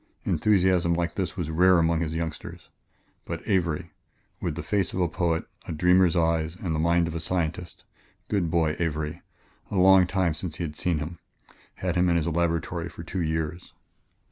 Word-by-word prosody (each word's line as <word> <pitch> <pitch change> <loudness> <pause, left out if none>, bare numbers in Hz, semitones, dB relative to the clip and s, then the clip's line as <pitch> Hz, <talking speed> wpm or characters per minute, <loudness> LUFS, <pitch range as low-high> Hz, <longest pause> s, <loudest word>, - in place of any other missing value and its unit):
Enthusiasm 95 -4 +3
like 85 0 -1
this 95 -1 -3
was 80 -3 -2
rare 90 +3 +5
among 85 0 +2
his 80 -1 -2
youngsters. 80 -1 -5 0.6
But - - -6
Avery 85 -6 0 0.5
with - - -2
the - - -5
face 100 -3 0
of - - -2
a 90 - +3
poet, 85 -1 -1 0.2
a - - -4
dreamer's 90 +2 +4
eyes 80 -1 +1
and 90 -3 -3
the 80 - -1
mind 85 +1 +3
of 80 - -5
a 85 - -3
scientist 85 0 -3 0.4
good 95 -6 0
boy, 80 -2 +1
Avery! 75 -2 -2 0.5
a - - -4
long 95 -1 +6
time 90 -3 +1
since 80 +1 -5
he 85 - -4
had 75 -2 -5
seen 85 0 0
him 80 +2 -5 0.6
had - - -2
him 90 0 +3
in 85 - +3
his 85 -2 +1
own 85 - -1
laboratory 85 0 -1
for 85 +1 -9
two 90 +2 -3
years.... 80 +1 -3
85 Hz, 190 wpm, -26 LUFS, 80-90 Hz, 0.6 s, long